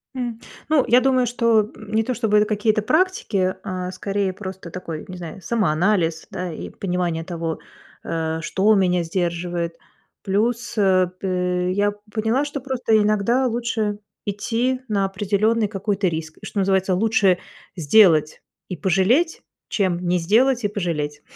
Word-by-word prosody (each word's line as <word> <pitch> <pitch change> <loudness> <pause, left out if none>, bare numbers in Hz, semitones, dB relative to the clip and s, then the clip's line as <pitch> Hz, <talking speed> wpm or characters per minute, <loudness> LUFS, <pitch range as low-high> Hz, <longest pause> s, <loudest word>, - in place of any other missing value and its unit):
М, 240 -3 -4 0.3
ну, 305 -4 +4
я 245 +2 +6
думаю, 255 -2 +2
что, 230 -2 +3 0.2
м, 215 -1 -11
не 225 0 +3
то 255 - -2
чтобы 220 -3 +2
это 210 - +4
какие-то 215 0 +1
практики, 220 - +1
а 185 -1 -4
скорее 195 0 -2
просто 190 -3 -8
такой, 165 -4 -6
не 185 -2 -8
знаю, 175 +2 -8
самоанализ, 175 -4 +1
да, 180 -1 -4
и 155 - -7
понимание 175 -3 -2
того, 165 -2 -4 0.4
э, 160 -1 -2
что 200 +5 +2
меня 180 -3 +2
сдерживает. 170 0 -2 0.5
Плюс, 225 +4 -1
э, 185 -2 +4
п 195 - -4
э, 180 0 0
я 205 +1 +1 0.2
поняла, 225 +6 +1
что 290 -2 -5
просто 250 -4 +1
иногда 215 +5 +2
лучше 225 -3 -1 0.3
идти 235 +5 -1
на 200 -2 +1
определенный 205 +3 +1
какой-то 200 -1 -1
риск, 160 -2 -4
и, - - -9
что 205 - -3
называется, 190 -1 +2
лучше 200 -2 +3 0.4
сделать 165 -2 +4 0.3
и 185 - -3
пожалеть, 195 - +2 0.3
чем 185 -4 0
не 180 +1 +2
сделать 235 +8 +3
и 205 - +3
пожалеть. 160 -7 -3
200 Hz, 150 wpm, -22 LUFS, 180-225 Hz, 0.5 s, я